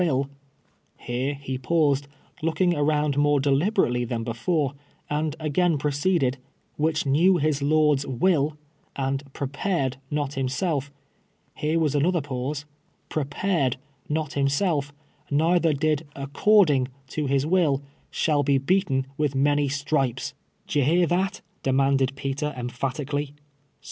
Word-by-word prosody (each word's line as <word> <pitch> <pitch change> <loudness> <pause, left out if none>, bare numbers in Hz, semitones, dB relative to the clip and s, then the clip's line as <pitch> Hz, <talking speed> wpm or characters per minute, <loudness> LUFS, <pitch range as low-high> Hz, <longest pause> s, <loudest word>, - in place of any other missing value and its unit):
v7/," 140 -5 +1 0.4
— - - -41
here 130 +4 -1
he 135 -2 -5
paused, 145 -2 +1 0.3
lookluL^ 175 +2 +1
around 150 -1 +1
more 145 0 +3
deliberately 140 - +2
than 115 -1 -3
be 115 0 -3
fore, 145 +3 0 0.4
and 150 0 -1
again 160 +2 +1
proceeded 145 -1 +1 0.2
— - - -42
"which 155 0 0
knew 170 +7 +4
his 150 -2 0
lord's 150 -1 +3
iv'dl, 150 +2 +1 0.4
and 135 0 -1
jjrejxi 140 0 -5
red 135 -9 0
not 145 -1 -2
himself" 135 +2 -1 0.3
— - - -42
here 155 +2 +1
was 155 -3 +1
another 170 +5 +2
pause 140 +1 -4 0.2
— - - -41
'•'• - - -11
jprc 135 - -9
pared 145 -7 0 0.3
not 155 +1 -1
himself, 145 +1 +1 0.4
neither 165 +3 +3
did 150 +1 0
according 140 0 +3 0.2
to 150 +2 -3
his 135 +1 +1
will, 155 -5 +2 0.3
shall 150 -3 +1
l)e 140 -1 +4
beaten 135 -2 +1
with 145 -3 +1
many 145 +1 +2
dripc^P 140 -2 -1 0.2
" - - -42
D'ye 145 - +1
hear 170 +6 +3
that 185 +3 0
\ - - -41
" - - -41
demanded 135 0 +2
Peter, 140 +2 -3
emphatically. 140 +3 -3
145 Hz, 145 wpm, -25 LUFS, 135-155 Hz, 0.4 s, knew